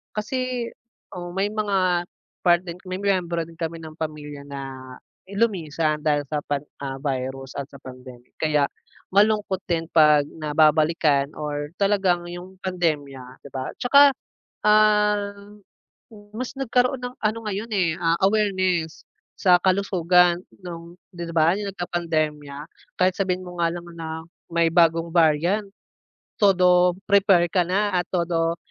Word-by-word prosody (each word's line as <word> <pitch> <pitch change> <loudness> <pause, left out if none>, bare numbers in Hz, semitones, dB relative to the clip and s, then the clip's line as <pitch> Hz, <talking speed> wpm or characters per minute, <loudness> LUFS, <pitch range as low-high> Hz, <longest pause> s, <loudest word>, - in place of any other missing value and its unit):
Kasi 250 +2 -2 0.4
o 175 -1 -6
may 195 +1 0
mga 185 -4 +1 0.4
part 175 -1 +5
din 170 -1 -7
may 185 - -3
miyembro 180 -4 0
din 165 -1 -15
kami 165 0 -4
ng 160 -1 -10
pamilya 150 -2 -6
na 135 -2 -8 0.3
lumisan 165 -8 0
dahil 150 -1 +1
sa 150 - -1
pan 145 -1 -1 0.2
ah, 135 -1 -4
virus 135 -1 -3
at 140 - -5
sa 140 - -12
pandemic, 125 -1 -12
kaya 150 -3 +2 0.5
malungkot 205 -2 +2
din 165 -1 0
'pag 150 -2 +6
nababalikan 155 -2 +2
or 145 -1 -4
talagang 195 -3 +2
'yung 175 +2 -9
pandemya 145 -8 -3
'di 140 - -10
ba. 130 -1 -4
'Tsaka, 280 +3 +7 0.6
ah, 210 -1 +4 1.0
mas 250 +3 -4
nagkaroon 250 0 +1
ng 250 0 -6
ano 215 +1 0
ngayon, 210 +2 -3
eh, 180 -4 +2
ah, 165 0 +2
awareness 185 -5 +1 0.3
sa 180 -2 +5
kalusugan 180 -2 +3 0.2
nung 170 0 -9 0.2
'di 170 -1 -6
ba 160 +1 +5
'yung 205 -1 -4
nagka-pandemya. 155 -5 -3 0.4
Kahit 185 0 +3
sabihin 185 -1 -1
mo 180 0 -9
nga 170 - +3
lang 175 0 -7
na 160 -1 -5 0.3
may 170 -1 +3
bagong 165 0 +3
variant, 170 +5 +2 0.7
todo 180 -3 +4
prepare 195 -3 +4
ka 180 - +3
na 200 +2 0
at 175 -1 0
todo 170 -2 0
175 Hz, 135 wpm, -23 LUFS, 155-195 Hz, 1.0 s, Tsaka